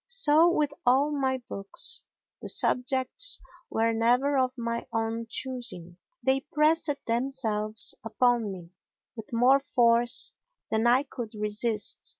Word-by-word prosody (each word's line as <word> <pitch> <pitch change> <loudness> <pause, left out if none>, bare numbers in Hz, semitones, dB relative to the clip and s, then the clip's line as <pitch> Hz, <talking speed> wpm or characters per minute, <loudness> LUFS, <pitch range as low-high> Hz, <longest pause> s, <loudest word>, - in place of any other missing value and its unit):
So 340 -9 +4
with 295 -4 0
all 270 +4 +3
my 265 -3 -1
books—the 195 0 -4
subjects 260 - +2 0.3
were 225 +1 0
never 245 +5 +2
of 255 -1 +1
my 235 0 -4
own 225 0 -3
choosing; 235 -11 -5 0.3
they 270 +2 +1
pressed 310 0 +2
themselves 230 -3 +1
upon 230 -1 +1
me 175 -3 -10 0.4
with 225 -2 -10
more 250 +4 +4
force 240 -3 +2 0.4
than 220 +1 +1
I 250 +3 +4
could 240 -5 -8
resist. 210 +1 -1
245 Hz, 120 wpm, -27 LUFS, 225-270 Hz, 0.4 s, So